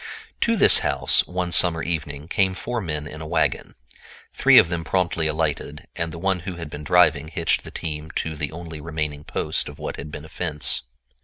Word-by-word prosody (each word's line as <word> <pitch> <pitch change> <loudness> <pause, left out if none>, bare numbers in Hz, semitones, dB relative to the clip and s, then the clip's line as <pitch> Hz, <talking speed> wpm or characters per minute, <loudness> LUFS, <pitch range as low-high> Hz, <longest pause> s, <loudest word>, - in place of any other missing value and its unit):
To 230 - +2
this - - +7
house, - - +3
one 90 0 -3
summer 85 -1 +4
evening, 75 -3 -4
came 95 +1 +1
four 120 +6 -3
men 75 -5 -4
in 75 +1 -8
a 80 - -6
wagon. - - -1 0.6
Three - - +5
of - - +8
them 85 -1 -3
promptly 85 -3 0
alighted, 75 -1 -2
and 85 -1 -3
the 85 - -8
one 95 +2 0
who 90 +1 -6
had 85 -3 -8
been 75 - -7
driving 80 -2 +3
hitched 80 +1 0
the - - -9
team 75 -1 -5
to 80 -1 -2
the 75 -1 -3
only 80 -2 -8
remaining 75 -2 -4
post - - -2
of 75 - -11
what 75 - -5
had 75 - -7
been 75 - -8
a - - -13
fence. 75 -5 -1
80 Hz, 205 wpm, -23 LUFS, 75-85 Hz, 0.6 s, of